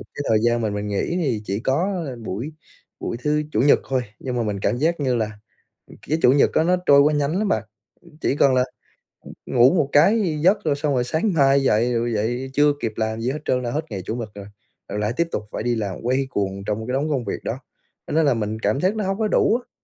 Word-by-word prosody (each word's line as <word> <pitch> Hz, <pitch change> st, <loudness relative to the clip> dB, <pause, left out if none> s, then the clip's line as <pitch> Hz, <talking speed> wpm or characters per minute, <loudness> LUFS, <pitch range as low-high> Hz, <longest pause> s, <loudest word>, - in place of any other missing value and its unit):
cái 145 Hz, -, -3 dB
thời 110 Hz, -, +4 dB
gian 120 Hz, 0 st, +2 dB
mà 110 Hz, -, 0 dB
mình 105 Hz, 0 st, -3 dB
nghỉ 105 Hz, -, -1 dB
thì 120 Hz, -8 st, -1 dB
chỉ 100 Hz, +1 st, -2 dB
có 170 Hz, -, -1 dB, 0.2 s
buổi 120 Hz, +12 st, -4 dB, 0.5 s
buổi -, -, -4 dB
thứ 150 Hz, 0 st, +1 dB
Chủ -, -, +1 dB
nhật 140 Hz, +2 st, +5 dB
thôi, 130 Hz, -1 st, +1 dB, 0.2 s
nhưng 125 Hz, -2 st, -4 dB
mà 120 Hz, -, 0 dB
mình 105 Hz, -2 st, -2 dB
cảm 120 Hz, -, 0 dB
giác 160 Hz, +4 st, 0 dB
như 130 Hz, -3 st, +1 dB
là, 110 Hz, -2 st, -3 dB, 0.5 s
ừm, -, -, -15 dB
cái 155 Hz, +2 st, +1 dB
Chủ 125 Hz, -, +6 dB
nhật 140 Hz, -, +4 dB
á 160 Hz, -, +4 dB
nó 180 Hz, +2 st, +3 dB
trôi 140 Hz, 0 st, +7 dB
quá 150 Hz, +2 st, +4 dB
nhanh 145 Hz, +4 st, 0 dB
lắm 210 Hz, 0 st, 0 dB
bạn, 110 Hz, -, +1 dB, 0.4 s
ừm, 170 Hz, -3 st, -19 dB
chỉ 140 Hz, -, 0 dB
cần 135 Hz, -2 st, +4 dB
là, 125 Hz, 0 st, +3 dB, 0.6 s
ừm, -, -, -12 dB
ngủ 125 Hz, +3 st, +4 dB
một 155 Hz, -6 st, +1 dB
cái 170 Hz, +1 st, +3 dB
giấc 200 Hz, +5 st, +3 dB
rồi 150 Hz, -3 st, +2 dB
xong 145 Hz, 0 st, -1 dB
rồi 125 Hz, -, +1 dB
sáng 160 Hz, -, 0 dB
mai 140 Hz, -3 st, +4 dB
dậy, 120 Hz, 0 st, +2 dB
rồi 120 Hz, 0 st, 0 dB
dậy 120 Hz, +5 st, -2 dB
chưa 145 Hz, +1 st, +4 dB
kịp 110 Hz, -2 st, -2 dB
làm 110 Hz, 0 st, -2 dB
gì 120 Hz, -, -1 dB
hết 150 Hz, -, -4 dB
trơn 125 Hz, -, +1 dB
là 120 Hz, -, -2 dB
hết 155 Hz, +5 st, -2 dB
ngày 100 Hz, -2 st, -4 dB
Chủ 110 Hz, -, -3 dB
nhật 115 Hz, -3 st, -5 dB
rồi, 100 Hz, -1 st, -8 dB, 0.4 s
rồi 105 Hz, +1 st, -3 dB
lại 105 Hz, +2 st, -1 dB
tiếp 170 Hz, -, +1 dB
tục -, -, -2 dB
phải -, -, -4 dB
đi 120 Hz, 0 st, 0 dB
làm 100 Hz, -5 st, -3 dB
quay 130 Hz, +3 st, 0 dB
cuồng 100 Hz, -4 st, -3 dB
trong 110 Hz, +2 st, -3 dB
cái 125 Hz, -, -2 dB
đống 145 Hz, +4 st, 0 dB
công 135 Hz, -6 st, -1 dB
việc 100 Hz, -, -4 dB
đó, 120 Hz, -, -3 dB, 0.5 s
cho -, -, -5 dB
nên 160 Hz, 0 st, +3 dB
là 140 Hz, -, +4 dB
mình 110 Hz, -1 st, -3 dB
cảm 110 Hz, +4 st, 0 dB
giác 190 Hz, +4 st, +1 dB
nó 215 Hz, -, -2 dB
hông 195 Hz, 0 st, -1 dB
có 220 Hz, -, +1 dB
đủ 220 Hz, -, +3 dB
á. -, -, -41 dB
130 Hz, 265 wpm, -22 LUFS, 110-150 Hz, 0.6 s, trôi